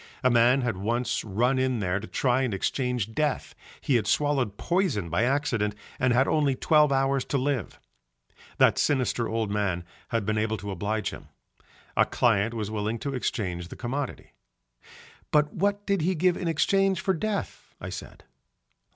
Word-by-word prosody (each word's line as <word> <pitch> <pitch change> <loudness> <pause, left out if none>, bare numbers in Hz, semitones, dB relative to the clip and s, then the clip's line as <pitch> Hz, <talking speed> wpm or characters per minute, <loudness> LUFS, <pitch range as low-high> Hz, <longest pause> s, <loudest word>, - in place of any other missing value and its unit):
A 130 - +4
man 120 +3 +4
had 120 -6 -1
once 115 +5 -1
run 120 +6 +1
in 130 -1 +1
there 95 -1 0
to 110 - -8
try 130 0 +1
and 125 -6 0
exchange 125 +1 -1
death, 150 +1 -1 0.3
he 130 - +2
had 110 - -2
swallowed 135 -8 +1
poison 150 - 0
by 100 +8 +2
accident 120 -6 0 0.2
and 130 -1 +2
had 130 +3 +3
only 145 -4 +2
twelve 150 +1 +4
hours 135 0 +2
to 140 - -1
live. 135 -4 -2 0.8
That - - +4
sinister 125 -4 +1
old 110 -2 -1
man 100 -4 -1 0.2
had 115 -3 -1
been 110 +1 0
able 110 0 0
to 100 +1 -6
oblige 105 +3 -2
him. - - -10 0.7
A - - +4
client 115 -1 +2
was 110 -2 -3
willing 110 +1 -2
to 140 +3 -4
exchange 90 -9 -2
the - - -10
commodity. 130 +3 -4 1.0
"But 150 0 +2
what 205 +2 0
did 200 -3 +1
he 180 +4 +1
give 180 +2 +2
in 175 - -3
exchange 195 +3 +2
for 190 0 +1
death?" 205 +4 -4
I - - -6
said. - - -9
125 Hz, 170 wpm, -27 LUFS, 110-145 Hz, 1.0 s, A